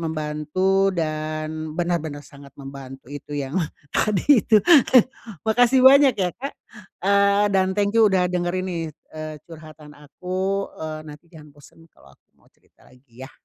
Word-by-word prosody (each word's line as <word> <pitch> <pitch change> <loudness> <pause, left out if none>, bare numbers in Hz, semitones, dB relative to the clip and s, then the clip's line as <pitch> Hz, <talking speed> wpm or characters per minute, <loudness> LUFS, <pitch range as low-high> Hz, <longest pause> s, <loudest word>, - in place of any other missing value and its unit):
membantu 160 +5 -1
dan 155 -1 -4
benar-benar 160 -5 -3
sangat 140 -1 -15
membantu, 135 -1 -11
itu 145 0 -10
yang 140 +2 -4 0.4
tadi 215 +5 +3
itu. 215 -2 +4 0.9
Makasih 245 +3 +3
banyak 275 -1 +7
ya, 185 -2 0
Kak! 275 +3 -6 0.5
Eee, 200 +1 +3
dan 190 0 +2
thank 200 0 +1
you 220 -2 +6
udah 185 -1 +2
dengarin 180 +1 -2
nih, 170 -2 -3 0.3
eee, 155 0 -7
curhatan 155 -2 -13
aku. 185 +7 -4
Eee, 155 -1 -6
nanti 150 +2 -13
jangan 155 -3 -15
bosan, 145 +3 -19
kalau - - -21
aku - - -43
mau - - -29
cerita - - -27
lagi, 125 -1 -18
ya. 135 - -12
165 Hz, 145 wpm, -22 LUFS, 150-195 Hz, 0.9 s, banyak